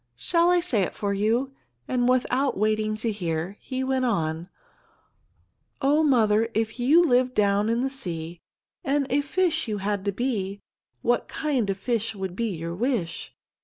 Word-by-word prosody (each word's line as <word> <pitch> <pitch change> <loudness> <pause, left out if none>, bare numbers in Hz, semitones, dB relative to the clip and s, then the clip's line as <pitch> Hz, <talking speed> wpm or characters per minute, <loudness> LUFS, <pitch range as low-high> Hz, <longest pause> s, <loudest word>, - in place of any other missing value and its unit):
"Shall 335 - +2
I 355 0 +4
say 270 - +1
it 185 - -2
for 200 -1 -1
you?" 230 +7 0 0.3
and 245 -1 +1
without 255 +1 +1
waiting 215 +1 +1
to 225 +1 -1
hear, 175 -1 -3
he 260 0 -4
went 260 0 0
on: 170 -7 -1 1.3
"Oh, 290 +3 +3
mother, 225 -6 +3
if 220 +2 -1
you 295 +8 +5
lived 255 -4 +2
down 205 +1 +2
in 230 +1 +1
the 265 - +1
sea 170 -9 -5 0.4
And 280 +1 +1
a 285 +2 +3
fish 325 0 0
you 210 -2 -2
had 200 0 -2
to 200 - +1
be, 200 -3 -2 0.4
What 240 -1 +1
kind 265 -9 -1
of 195 - -1
fish 230 +1 -2
would 190 -2 -5
be 230 +3 -1
your 170 -2 -4
wish? 200 -5 -2
225 Hz, 165 wpm, -25 LUFS, 200-260 Hz, 1.3 s, you